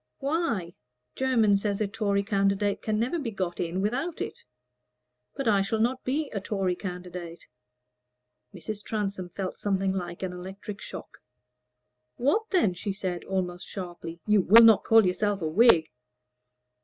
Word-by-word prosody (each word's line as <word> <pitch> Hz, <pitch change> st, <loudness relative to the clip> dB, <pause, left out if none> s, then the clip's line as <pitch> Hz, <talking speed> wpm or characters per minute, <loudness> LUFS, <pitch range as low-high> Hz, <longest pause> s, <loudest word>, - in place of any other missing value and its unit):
"Why? 270 Hz, -, -1 dB, 0.4 s
Jermyn 230 Hz, -6 st, +3 dB
says 200 Hz, 0 st, -2 dB
a 215 Hz, -, +1 dB
Tory 200 Hz, -1 st, 0 dB
candidate 200 Hz, 0 st, +1 dB
can 215 Hz, -1 st, -1 dB
never 255 Hz, +9 st, 0 dB
be 270 Hz, -6 st, -3 dB
got 185 Hz, -5 st, -4 dB
in 175 Hz, +2 st, -2 dB
without 270 Hz, -, -2 dB
it." -, -, -6 dB, 0.9 s
"But 275 Hz, -2 st, -3 dB
I 205 Hz, -3 st, +4 dB
shall 220 Hz, +3 st, -1 dB
not 250 Hz, +3 st, 0 dB
be 280 Hz, +3 st, -1 dB
a 200 Hz, -, -3 dB
Tory 195 Hz, -3 st, -1 dB
candidate." 180 Hz, -2 st, -7 dB, 1.1 s
Mrs. 215 Hz, -1 st, -7 dB
Transome 200 Hz, -4 st, -3 dB
felt 185 Hz, +1 st, -5 dB
something 195 Hz, -1 st, 0 dB
like 175 Hz, -1 st, -5 dB
an 185 Hz, -1 st, -3 dB
electric 190 Hz, +3 st, -8 dB
shock. -, -, -9 dB, 1.0 s
"What 415 Hz, -, +1 dB
then?" 340 Hz, -, +2 dB
she 195 Hz, +3 st, -4 dB
said, 185 Hz, -3 st, -4 dB
almost 180 Hz, -2 st, -3 dB
sharply. 175 Hz, -3 st, -7 dB
"You 210 Hz, -2 st, +4 dB
will 225 Hz, +6 st, +8 dB
not 225 Hz, -3 st, +7 dB
call 225 Hz, -2 st, +6 dB
yourself 200 Hz, +2 st, 0 dB
a -, -, 0 dB
Whig?" 170 Hz, -2 st, +5 dB
200 Hz, 150 wpm, -27 LUFS, 185-225 Hz, 1.1 s, will